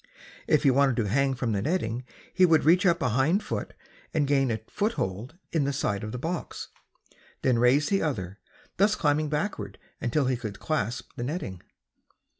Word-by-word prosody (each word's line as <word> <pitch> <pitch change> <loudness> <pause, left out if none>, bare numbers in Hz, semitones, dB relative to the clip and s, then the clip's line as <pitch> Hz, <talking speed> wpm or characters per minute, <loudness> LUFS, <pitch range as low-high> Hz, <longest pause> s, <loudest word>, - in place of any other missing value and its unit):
If 150 - +3
he 140 - +5
wanted 135 -1 +3
to 110 -3 0
hang 135 +5 +1
from 120 -2 -1
the 100 -2 0
netting 125 - -1 0.3
he 185 - +3
would 165 -3 +5
reach 180 +5 +5
up 170 -1 +2
a 125 - +2
hind 135 - +2
foot - - -4 0.4
and 150 -2 +3
gain 135 -2 +2
a 115 - 0
foothold 145 - -2
in 160 -3 +1
the 140 - 0
side 105 -6 -1
of 110 - -4
the 125 - -4
box, 165 +6 -4 0.7
then 125 -3 +3
raise 130 +5 +4
the 195 - +2
other, 100 - -3 0.4
thus 205 +3 +4
climbing 150 -1 +1
backwards 155 +8 -3 0.2
until 130 +3 +1
he 130 -1 +1
could 110 -4 -6
clasp 125 -7 -2
the 120 - -3
netting. 125 - -4
140 Hz, 185 wpm, -27 LUFS, 120-160 Hz, 0.7 s, he